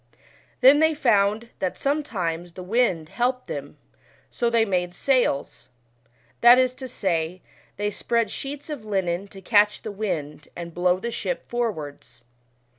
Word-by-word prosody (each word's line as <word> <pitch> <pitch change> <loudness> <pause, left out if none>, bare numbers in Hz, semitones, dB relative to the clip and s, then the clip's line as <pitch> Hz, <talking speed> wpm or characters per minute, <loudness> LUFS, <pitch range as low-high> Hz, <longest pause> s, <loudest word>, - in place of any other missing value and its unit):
Then 270 +3 +8
they 315 0 +3
found 225 -4 +2
that 185 - -2
sometimes 180 - -2
the 185 - -8
wind 180 -6 +1
helped 250 +1 -1
them, - - -7 0.5
so 235 - 0
ohey 230 -1 +3
made 180 -2 -1
sails 250 - 0 0.7
that 240 +1 +9
is 255 -1 +3
to 260 0 -8
say, 180 -6 -2 0.3
they 205 +1 -1
spread 230 +2 0
sheets 285 +2 -6
of 285 -7 -5
linen 190 -3 -1
to 195 -1 -12
catch 210 0 +3
the 215 - -4
wind, 155 -8 -4
and 170 -1 -7
blow 180 +1 +2
the 235 +4 -4
ship - - -4
forwards. 155 - -4
210 Hz, 145 wpm, -24 LUFS, 180-245 Hz, 0.7 s, that